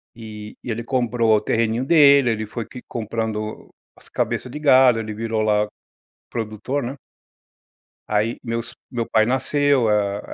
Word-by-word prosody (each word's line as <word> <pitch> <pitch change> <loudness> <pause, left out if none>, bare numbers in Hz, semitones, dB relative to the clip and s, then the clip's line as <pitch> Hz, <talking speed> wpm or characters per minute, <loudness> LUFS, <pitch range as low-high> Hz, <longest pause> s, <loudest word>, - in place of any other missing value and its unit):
E 105 -2 -9
e - - -7
ele 115 +2 -3
comprou 120 -3 +2
o 105 - +1
terreninho 115 +2 0
dele, 140 -4 +6
ele 110 0 -2
foi 110 +2 -6
que 125 - -10
comprando 110 -1 -4 0.2
as - - -20
cabeças 125 - -2
de 150 - -6
gado, 130 -5 +5
ele 110 -1 -5
virou, 110 0 -2
lá, 105 -1 +2 0.6
produtor, 115 +5 -3
né. 130 +3 -5 1.1
Aí, 105 +2 0
meus 115 0 -4 0.2
meu 120 -3 -2
pai 110 -1 +4
nasceu, 130 0 +2
hã, 105 -1 +1
115 Hz, 150 wpm, -22 LUFS, 110-125 Hz, 1.1 s, dele